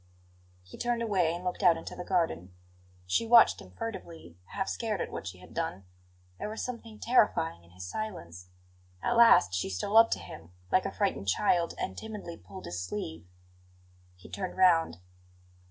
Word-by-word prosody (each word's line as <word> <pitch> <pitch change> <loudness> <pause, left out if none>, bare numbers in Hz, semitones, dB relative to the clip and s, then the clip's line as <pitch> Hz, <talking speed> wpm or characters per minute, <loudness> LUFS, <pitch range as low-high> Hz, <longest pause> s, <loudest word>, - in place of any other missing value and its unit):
He 90 - -13
turned 240 -1 0
away, 190 -7 +2
and 175 +2 -5
looked 180 +2 -3
out 175 -4 +5
into 165 - -8
the 180 - -6
garden. 95 - -1 0.5
She 160 - 0
watched 235 0 +6
him - - -13
furtively, 165 - -8
half 190 - -4
scared 215 -4 -2
at - - -3
what - - -6
she 90 0 -7
had 90 - -15
done; 95 +2 -3 0.5
there - - -4
was 220 - -4
something 230 -3 -7
terrifying 185 - +2
in 85 - -20
his 90 +1 -9
silence. 90 - -6 0.6
At 240 - +1
last 230 - +6
she 90 +1 -1
stole 95 - 0
up 225 0 +8
to - - 0
him, 85 +1 -11 0.2
like 185 - +3
a - - -4
frightened 195 - -1
child, 170 - +2
and 95 - -3
timidly 210 - -7
pulled 95 0 -11
his 90 +1 -4
sleeve. 85 -3 -5 0.9
He 90 - -15
turned 185 -2 -5
round. 165 - +4
170 Hz, 175 wpm, -30 LUFS, -, 0.9 s, up